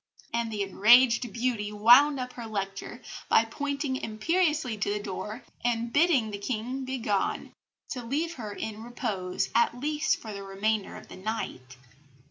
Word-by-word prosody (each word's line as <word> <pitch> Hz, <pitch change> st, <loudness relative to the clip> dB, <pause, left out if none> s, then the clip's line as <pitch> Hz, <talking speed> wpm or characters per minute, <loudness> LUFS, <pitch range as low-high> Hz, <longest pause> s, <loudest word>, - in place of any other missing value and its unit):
And 235 Hz, -1 st, -1 dB
the 210 Hz, -2 st, -1 dB
enraged 235 Hz, +4 st, +5 dB
beauty 230 Hz, -4 st, -1 dB
wound 245 Hz, +7 st, +6 dB
up 250 Hz, 0 st, -5 dB
her 235 Hz, -2 st, -7 dB
lecture 200 Hz, +3 st, -5 dB, 0.3 s
by 225 Hz, -, +5 dB
pointing 280 Hz, +2 st, -2 dB
imperiously 300 Hz, +2 st, 0 dB
to 200 Hz, -, 0 dB
the 210 Hz, -, -1 dB
door 210 Hz, +4 st, -6 dB, 0.2 s
and 235 Hz, -1 st, 0 dB
bidding 285 Hz, -9 st, +3 dB
the 200 Hz, -, -5 dB
King 250 Hz, +4 st, -3 dB
begone, 230 Hz, -7 st, -1 dB, 0.4 s
"to 255 Hz, -, -4 dB
leave 305 Hz, +8 st, -1 dB
her 220 Hz, -8 st, -6 dB
in 215 Hz, +1 st, -5 dB
repose, 220 Hz, -6 st, -3 dB
at 235 Hz, +1 st, +2 dB
least 300 Hz, +2 st, +1 dB
for 220 Hz, -2 st, -8 dB
the 200 Hz, -, -6 dB
remainder 200 Hz, +2 st, -1 dB
of -, -, -11 dB
the -, -, -11 dB
night." 185 Hz, -, -5 dB
230 Hz, 155 wpm, -28 LUFS, 210-260 Hz, 0.4 s, wound